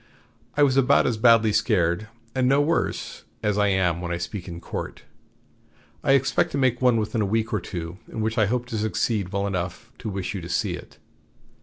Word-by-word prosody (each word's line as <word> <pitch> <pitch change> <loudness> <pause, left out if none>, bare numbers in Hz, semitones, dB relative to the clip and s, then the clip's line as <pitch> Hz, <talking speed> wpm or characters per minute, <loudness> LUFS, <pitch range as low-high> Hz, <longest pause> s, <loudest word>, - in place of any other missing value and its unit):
I 145 - +5
was 135 -2 +3
about 135 -2 +4
as 115 - 0
badly 115 -2 +5
scared, 105 -3 +1 0.3
and 130 -1 +2
no 140 +1 +4
worse, 155 +3 -1 0.2
as 105 -1 +1
I 105 - +4
am 90 -3 +1
when 85 -1 -4
I 85 - -1
speak 85 +2 -5
in 85 -1 -6
court. - - -6 1.0
I 135 - +4
expect 135 0 +2
to - - 0
make 130 -3 +1
one 125 -2 +4
within 110 +1 -1
a - - +2
week 110 +3 0
or 105 - +2
two 85 0 -6
in - - -7
which 110 +1 0
I 105 - +4
hope 125 +2 -1
to 110 - -2
succeed 110 -2 0
well 100 0 -1
enough 95 +4 -4
to 110 - -4
wish 95 0 -3
you 95 - -4
to 85 - -8
see - - 0
it." - - -10
110 Hz, 210 wpm, -24 LUFS, 95-120 Hz, 1.0 s, I